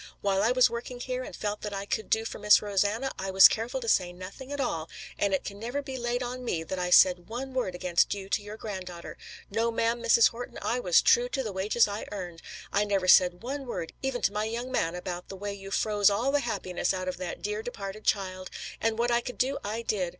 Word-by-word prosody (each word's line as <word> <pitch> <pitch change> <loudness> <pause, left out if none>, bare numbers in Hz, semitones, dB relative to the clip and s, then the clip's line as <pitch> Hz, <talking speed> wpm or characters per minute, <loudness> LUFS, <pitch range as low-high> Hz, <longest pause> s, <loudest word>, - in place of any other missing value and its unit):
While 195 -1 +1
I 220 +4 +3
was 250 0 +5
working 245 +1 -6
here 255 +1 -3
and - - -7
felt 210 0 -3
that 210 -1 -4
I 195 0 -4
could 215 - -3
do 220 0 +2
for - - -6
Miss 210 0 +6
Rosanna, 205 +6 0
I 190 0 -3
was 190 0 +9
careful 235 +4 -2
to 230 - -6
say 180 -5 +3
nothing 190 +10 -10
at 285 - -4
all, 165 - -2 0.3
and 200 - +2
it 190 - 0
can 200 0 -7
never 245 +6 -3
be 265 -1 -6
laid 240 0 -2
to 250 +1 -4
me 205 -10 -2
that 185 +3 -4
I 180 0 -1
said 180 0 +5
one 260 +3 -5
word 245 -9 -1
against 180 -1 +2
you 195 -1 -7
to 200 - 0
your 210 +1 -9
granddaughter. 185 -5 -7 0.4
No, 225 +3 +1
ma'am, 230 +1 0
Mrs. 235 0 +5
Horton, 245 +1 -8
I 245 - 0
was 180 -8 +4
true 245 +1 +4
to 265 +1 -2
the 215 -4 -4
wages 210 +5 +2
I 205 +1 -5
earned. 175 -5 -6 0.3
I 205 - +3
never 200 -3 0
said 180 +1 +5
one 270 +2 -4
word 165 -8 -4
even 265 -2 -2
to 200 - +2
my 210 +1 -1
young 235 +3 -4
man 165 -8 0
about 180 0 -5
the 195 - -7
way 200 +1 -5
you 195 -1 -9
froze 205 0 +3
all 230 +7 +1
the 290 - +3
happiness 195 -7 -2
out 185 0 -4
of 180 -1 -3
that 180 -1 -6
dear 210 +1 -2
departed 210 -2 -7
child. 185 -2 -1 0.3
And 225 0 +1
what 240 +1 +1
I 235 0 +3
could 250 +1 -7
do 270 +2 0
I 220 +3 -3
did. 195 -6 -1
210 Hz, 245 wpm, -28 LUFS, 190-240 Hz, 0.4 s, was